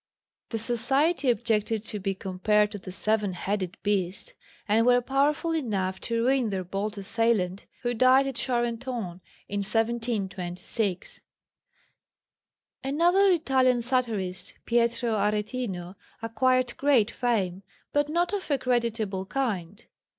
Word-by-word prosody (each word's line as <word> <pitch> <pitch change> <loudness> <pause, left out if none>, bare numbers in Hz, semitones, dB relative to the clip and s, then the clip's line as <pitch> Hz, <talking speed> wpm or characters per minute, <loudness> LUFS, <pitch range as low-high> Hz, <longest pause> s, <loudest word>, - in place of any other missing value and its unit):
The 225 - -2
Society 265 +6 +2
objected 220 -2 0
to 210 -1 -4
be 195 0 -2
compared 205 +3 +1
to 205 - -6
the 185 - -9
Seven 210 0 +1
headed 190 +1 -3
Beast, 200 - -1 0.3
and 220 +2 +3
were 245 +1 +5
powerful 280 +6 +1
enough 195 -11 -1
to 230 0 -1
ruin 260 -3 +2
their 190 -2 -2
bold 200 +4 -3
assailant, 200 -2 0 0.2
who 240 0 0
died 255 +3 +5
at 270 - -2
Charenton 235 -5 -2 0.3
in 205 - -2
1726. 205 -3 -2 1.6
Another 345 +8 +3
Italian 260 -8 +3
satirist, 215 -8 -1
Pietro 235 0 +1
Aretino, 210 -3 -2 0.3
acquired 250 +2 +1
great 260 -7 +3
fame, 195 -7 -1 0.3
but 290 0 +2
not 345 +4 0
of 400 -4 -3
a 285 - +2
creditable 230 -6 -1
kind. 205 -6 -3
230 Hz, 120 wpm, -27 LUFS, 200-255 Hz, 1.6 s, were